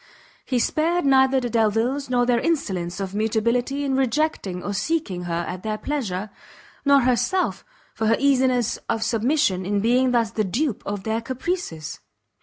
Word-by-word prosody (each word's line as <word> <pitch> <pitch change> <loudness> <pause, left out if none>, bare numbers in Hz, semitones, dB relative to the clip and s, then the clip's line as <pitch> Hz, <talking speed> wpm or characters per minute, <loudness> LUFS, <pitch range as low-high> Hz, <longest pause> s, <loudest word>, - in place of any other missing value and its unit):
He 255 - -1
spared 325 +7 +1
neither 265 -1 +4
the 245 - -2
Delviles 230 +5 +1
for 245 -1 +2
their 240 -1 +2
insolence 190 - -1
of 195 -1 -4
mutability 235 +6 0
in 270 -1 0
rejecting 260 - 0
or 205 - -3
seeking 200 - -2
her 170 0 -2
at 180 0 -5
their 215 0 -3
pleasure, 215 -8 -3 0.5
nor 280 -1 +5
herself 255 +9 +1 0.3
for 220 - -1
her 225 - +3
easiness 255 -4 +2
of 225 - 0
submission 225 -4 +1
in 200 +2 0
being 250 +4 +3
thus 235 -3 +1
the 220 -1 0
dupe 235 - -1
of 200 -1 -3
their 220 +1 -1
caprices. 250 - -4
235 Hz, 160 wpm, -23 LUFS, 205-270 Hz, 0.5 s, nor